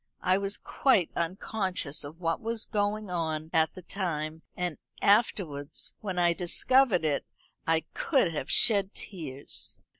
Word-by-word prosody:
I 185 +1 +3
was 200 +1 -1
quite 220 - +2
unconscious 185 -2 -1
of 150 +4 -9
what 165 -2 -1
was 225 0 -2
going 210 -1 -1
on 160 -2 -2
at 160 -1 +3
the 185 - -9
time; 160 -4 -3 0.2
and 180 -4 -2 0.2
afterwards, 165 -9 +2
when 190 -4 -3
I 175 -1 +4
discovered 190 +2 +3
it, 145 -2 +1 0.4
I 165 0 +3
could 260 - +2
have 145 -2 -4
shed 200 -3 +4
tears. 145 -8 -6
180 Hz, 140 wpm, -29 LUFS, 160-200 Hz, 0.4 s, I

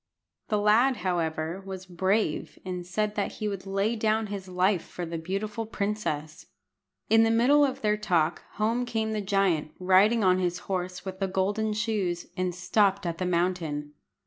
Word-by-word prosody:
The 210 - +1
lad, 220 +6 +4
however, 165 0 -1
was 190 -1 -7
brave, 185 0 0
and 180 -1 -4
said 210 +3 -1
that 205 -1 -2
he 215 - -3
would 195 -2 -5
lay 195 +4 0
down 220 0 +1
his 195 -2 -6
life 185 0 +2
for 175 - -6
the 165 0 -4
beautiful 205 +6 -3
princess. 200 -8 -3 0.6
In 225 0 +5
the 225 - +4
middle 250 +6 +5
of 270 -2 0
their 210 -1 +2
talk 175 -6 +1
home 225 +4 0
came 220 -2 -1
the 215 -1 -1
giant, 190 -6 +1
riding 195 +5 +4
on 185 -1 +4
his 175 -1 0
horse 185 -1 -3
with 190 0 -6
the 195 - 0
golden 205 +3 0
shoes, 210 -5 -1
and 185 -2 -1
stopped 195 +1 +2
at 170 -1 -3
the 185 - -1
mountain. 170 -4 -1
195 Hz, 170 wpm, -27 LUFS, 180-215 Hz, 0.6 s, In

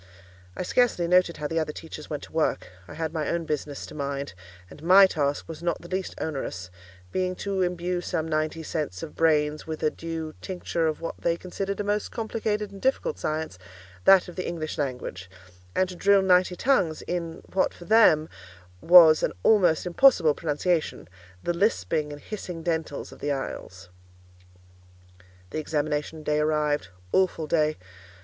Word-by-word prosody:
I - - -2
scarcely 180 -4 +2
noted 180 -1 +3
how 150 - -5
the 165 +2 -1
other 155 -1 -2
teachers 155 0 -9
went 150 - -4
to - - -11
work; 160 - 0 0.2
I - - -10
had 160 -1 -3
my 155 -3 -2
own 170 -1 -1
business 150 -2 -4
to - - -11
mind; 140 -1 -4 0.3
and 145 - -14
my 185 +4 +8
task 145 -6 -1
was 160 -1 -8
not 170 -1 -1
the 175 - -11
least 185 +1 -3
onerous, 90 -12 -4 0.4
being 185 0 -1
to 195 -1 -1
imbue 180 0 -1
some 160 -2 -2
ninety 155 +1 -1
sets 150 - -4
of 155 - -8
brains 150 -2 +2
with 160 -1 -5
a 155 - +3
due 165 -1 -5
tincture 175 -3 -2
of 155 0 -2
what 165 - -5
they 170 0 0
considered 195 +3 -4
a - - 0
most 205 0 -1
complicated 215 -2 -2
and 195 -1 -11
difficult 365 - 0
science, 155 -10 -3 0.5
that 195 -2 +7
of 175 - -10
the 185 - -3
English 160 -3 -4
language; 125 -9 -4 0.5
and 185 - +2
to 180 - -7
drill 200 +1 +4
ninety 180 -1 +4
tongues 185 - +1
in 170 -2 -4
what, 190 - +2
for 175 - -13
them, 170 -8 +5 0.5
was 165 -3 +8
an - - 0
almost 180 -8 +4
impossible 180 - +5
pronunciation—the 145 - -3
lisping 155 - 0
and 145 -1 -9
hissing 180 -6 -6
dentals 160 -4 -3
of - - -13
the 145 - -2
Isles. 135 -9 -6 1.6
The - - -2
examination 155 0 -2
day 150 0 +1
arrived. 150 -5 +1 0.3
Awful 185 -4 +2
day! 155 -1 +1
165 Hz, 170 wpm, -26 LUFS, 150-180 Hz, 1.6 s, my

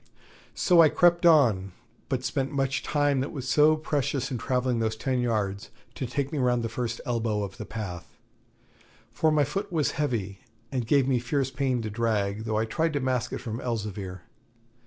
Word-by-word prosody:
So 175 -2 +5
I 160 - +7
crept 175 +1 +4
on, 110 - +4 0.4
but 130 -1 -1
spent 135 +2 -1
much 135 -1 0
time 145 -2 +1
that 135 - -2
was 130 -3 -6
so 150 +4 +5
precious 145 -4 -2
in 125 - -2
travelling 125 0 0
those 110 -1 0
ten 130 +3 -1
yards 105 -4 -1 0.2
to 130 - -4
take 135 +3 -2
me 150 - -2
round 125 -2 +2
the 115 - -2
first 115 0 -3
elbow 115 -4 -1
of 95 -1 -7
the - - -7
path; 90 -6 -7 0.9
for 155 +7 +2
my 150 -1 +3
foot 200 +7 -3
was 155 -4 +1
heavy 115 -10 -2 0.3
and 125 -4 -2
gave 135 +1 +3
me 130 -2 +2
fierce 130 +2 -1
pain 130 -3 -1
to 110 - -4
drag, 110 -2 -1
though 110 -1 -1
I 110 - +1
tried 160 +8 -1
to 145 - 0
mask 130 -2 -1
it - - -3
from 115 -2 -5
Elzevir. 100 -6 -4
125 Hz, 190 wpm, -27 LUFS, 110-140 Hz, 0.9 s, I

